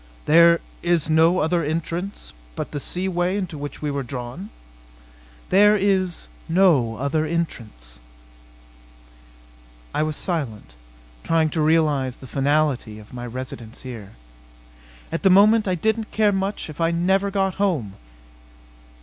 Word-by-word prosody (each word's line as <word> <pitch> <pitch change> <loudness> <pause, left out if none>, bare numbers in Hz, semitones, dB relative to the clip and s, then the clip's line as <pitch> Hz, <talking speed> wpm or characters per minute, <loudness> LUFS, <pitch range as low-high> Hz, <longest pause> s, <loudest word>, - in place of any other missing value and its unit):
"There 170 +2 +6 0.2
is 170 -3 +1
no 165 +3 +4
other 170 +2 +1
entrance 165 - -4 0.2
but - - -5
the 145 - -4
sea 180 +6 -3
way 180 +1 0
into 185 -5 -4
which 145 +1 -7
we 150 - -1
were 140 0 -2
drawn?" 130 - -7 1.0
"There 210 +2 +6
is 190 - 0 0.2
no 165 -11 +3
other 140 +6 -1
entrance." 115 - -4 1.9
I - - 0
was 155 0 -1
silent, 140 - -4 0.5
trying 160 -1 +1
to 160 - -1
realize 150 -5 +2
the - - -13
finality 140 -4 0
of 105 +2 -14
my 120 -1 -6
residence 120 -1 -8
here. 115 -6 -9 1.0
At - - -2
the 195 - +4
moment 210 +3 +5
I 185 - +1
didn't 220 +5 -1
care 215 -1 +2
much 195 +1 -2
if 155 +1 -8
I 165 - +3
never 190 +4 +1
got 195 -1 -1
home! 150 - 0
160 Hz, 135 wpm, -22 LUFS, 135-185 Hz, 1.9 s, There